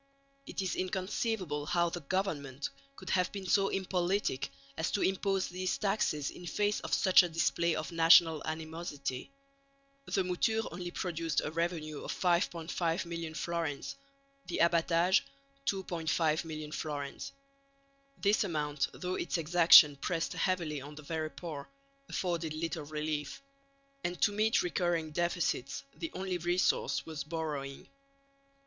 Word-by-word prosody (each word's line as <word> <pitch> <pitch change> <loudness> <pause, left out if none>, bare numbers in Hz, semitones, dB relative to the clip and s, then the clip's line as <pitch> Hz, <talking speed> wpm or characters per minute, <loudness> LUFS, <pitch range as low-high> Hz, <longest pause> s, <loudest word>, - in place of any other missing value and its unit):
It 255 -11 -3
is 185 - -1
inconceivable 185 -4 -2
how 170 -1 +2
the 175 - -3
government 145 -5 -2 0.2
could 185 - -7
have 180 -1 +2
been 200 -2 -6
so 195 +2 +3
impolitic 185 -5 0 0.3
as 160 - -1
to 205 - +1
impose 195 0 +1
these 185 +1 -2
taxes 195 -8 0
in 175 - -10
face 205 +5 +1
of - - -7
such 185 -2 +6
a 175 - -2
display 170 0 +1
of 155 -3 -4
national 165 -1 +6
animosity. 155 - -4 0.8
The 190 - +1
mouture 220 +5 +1
only 175 0 -5
produced 165 -4 -1
a 150 - -3
revenue 165 -2 -2
of - - -3
5,500,000 170 -2 0
fl.; 145 -4 -2 0.5
the - - -2
abbatage 170 +2 +4 0.5
2,500,000 160 -4 -1
fl. 140 -2 -4 0.9
This 205 +2 +3
amount, 150 -6 -1
though 180 0 -3
its 180 - -1
exaction 165 -3 +8
pressed 165 +3 -1
heavily 170 -6 -1
on 145 +2 -9
the 150 - -10
very 155 +1 -2
poor, 155 -4 -7 0.4
afforded 170 -4 -2
little 160 -1 -3
relief; 150 - -3 0.6
and 175 0 -2
to - - +5
meet 215 +2 +2
recurring 175 -2 0
deficits 165 -5 -1
the 165 +1 -4
only 185 -1 -2
resource 175 +2 +1
was 155 -3 -5
borrowing. 150 -3 -4
170 Hz, 130 wpm, -32 LUFS, 155-180 Hz, 0.9 s, exaction